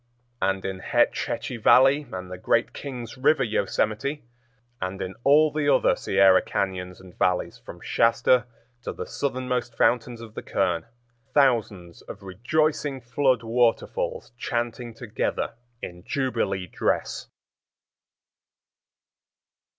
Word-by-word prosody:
And 95 Hz, 0 st, 0 dB
in 95 Hz, -1 st, -4 dB
Hetch -, -, +1 dB
Hetchy 125 Hz, -, -4 dB
Valley 135 Hz, +5 st, +5 dB
and 90 Hz, 0 st, -6 dB
the 90 Hz, -, -6 dB
great 115 Hz, +5 st, +1 dB
King's 125 Hz, -3 st, -7 dB
River 135 Hz, +1 st, +3 dB
yosemite, 110 Hz, +5 st, -1 dB, 0.6 s
and 95 Hz, +1 st, -3 dB
in 95 Hz, 0 st, -4 dB
all 150 Hz, +2 st, +5 dB
the 150 Hz, -1 st, 0 dB
other -, -, +4 dB
Sierra 95 Hz, -1 st, +4 dB
cañons 90 Hz, -2 st, -3 dB
and 95 Hz, -1 st, -15 dB
valleys 90 Hz, -1 st, 0 dB
from -, -, -11 dB
Shasta 120 Hz, +1 st, +3 dB, 0.3 s
to -, -, -5 dB
the -, -, -6 dB
southernmost 125 Hz, -3 st, -3 dB
fountains 120 Hz, -1 st, +2 dB
of 115 Hz, -2 st, -10 dB
the -, -, -6 dB
Kern, 85 Hz, +3 st, -1 dB, 0.5 s
thousands 110 Hz, -, +1 dB
of 100 Hz, -, -10 dB
rejoicing 135 Hz, -, 0 dB
flood 125 Hz, 0 st, +1 dB
waterfalls 115 Hz, 0 st, 0 dB
chanting 120 Hz, -1 st, -3 dB
together 115 Hz, 0 st, -3 dB, 0.3 s
in 90 Hz, 0 st, -7 dB
jubilee 130 Hz, -9 st, -1 dB
dress. 85 Hz, -, -2 dB
115 Hz, 120 wpm, -25 LUFS, 95-130 Hz, 0.6 s, Valley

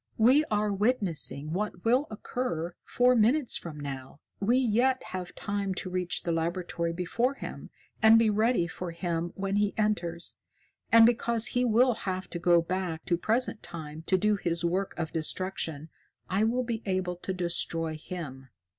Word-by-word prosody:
We 255 Hz, +7 st, +5 dB
are 210 Hz, -4 st, 0 dB
witnessing 190 Hz, -, 0 dB
what 195 Hz, -1 st, -3 dB
will 250 Hz, +6 st, +3 dB
occur 205 Hz, -6 st, -3 dB
four 250 Hz, +1 st, +3 dB
minutes 245 Hz, +5 st, +3 dB
from 155 Hz, -3 st, -5 dB
now. 135 Hz, -1 st, -7 dB, 0.2 s
We 230 Hz, +5 st, +3 dB
yet 255 Hz, +1 st, +2 dB
have 185 Hz, -1 st, -6 dB
time 200 Hz, -2 st, -2 dB
to 185 Hz, -, -4 dB
reach 180 Hz, -1 st, -1 dB
the 170 Hz, -, -1 dB
laboratory 170 Hz, 0 st, -1 dB
before 230 Hz, +10 st, -1 dB
him -, -, -8 dB, 0.3 s
and 220 Hz, 0 st, +8 dB
be 225 Hz, -1 st, +4 dB
ready 215 Hz, -3 st, +2 dB
for 175 Hz, +1 st, -6 dB
him 170 Hz, 0 st, -3 dB
when 195 Hz, +1 st, -1 dB
he 205 Hz, -1 st, +1 dB
enters. 180 Hz, -6 st, -1 dB, 0.5 s
And 230 Hz, 0 st, +9 dB
because 235 Hz, -1 st, +2 dB
he 245 Hz, -, +2 dB
will 245 Hz, +2 st, +4 dB, 0.2 s
have 185 Hz, 0 st, -3 dB
to 175 Hz, -, -4 dB
go 170 Hz, -1 st, +4 dB
back 180 Hz, -2 st, -3 dB
to 175 Hz, -, +2 dB
Present 225 Hz, +5 st, 0 dB
Time 155 Hz, -2 st, -7 dB
to 185 Hz, -, +4 dB
do 210 Hz, +2 st, +2 dB
his 170 Hz, -2 st, -1 dB
work 185 Hz, +3 st, -1 dB
of 160 Hz, -2 st, -3 dB
destruction, 160 Hz, -2 st, -3 dB, 0.4 s
I 195 Hz, +4 st, +1 dB
will 245 Hz, +3 st, +1 dB
be 230 Hz, -2 st, -3 dB
able 185 Hz, -2 st, -1 dB
to 185 Hz, -, -5 dB
destroy 170 Hz, -3 st, -1 dB
him. 150 Hz, -5 st, -7 dB
185 Hz, 165 wpm, -29 LUFS, 170-225 Hz, 0.5 s, And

